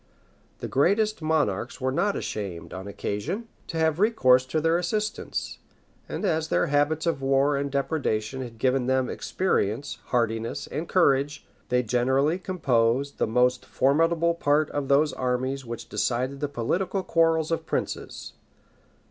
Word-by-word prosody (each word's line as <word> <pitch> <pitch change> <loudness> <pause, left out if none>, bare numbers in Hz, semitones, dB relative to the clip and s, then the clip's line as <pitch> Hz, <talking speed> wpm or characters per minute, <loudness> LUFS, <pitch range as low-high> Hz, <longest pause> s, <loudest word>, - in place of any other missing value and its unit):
The - - -3
greatest 205 +8 +2
monarchs 145 -9 0
were 130 0 0
not 200 +9 +1
ashamed, 95 -6 -5
on 95 +2 -7
occasion, 105 - -4 0.2
to 165 - -4
have 160 0 +1
recourse 130 - +4
to 155 +4 0
their 165 +2 +2
assistance; 210 +4 -3 0.5
and - - -3
as 160 -4 +1
their - - +2
habits 150 +1 +1
of 165 -5 0
war 135 +2 +2
and 140 0 -1
depredation 135 -4 -1
had 120 -3 -8
given 130 +1 +1
them 130 -1 +1
experience, 140 - -1
hardiness, 115 +3 -1
and 155 +4 -5
courage, 145 -5 +2 0.2
they 125 0 +2
generally 130 - +1
composed 140 -7 0
the - - +2
most 125 +3 +2
formidable 165 +5 +2
part 150 -2 +1
of 145 -2 -2
those 145 +2 +3
armies 130 +1 -2
which 115 0 -6
decided 130 +4 -1
the 145 - -1
political 180 - -1
quarrels 165 -2 +2
of 165 - -2
princes. - - -4
140 Hz, 145 wpm, -26 LUFS, 125-165 Hz, 0.5 s, recourse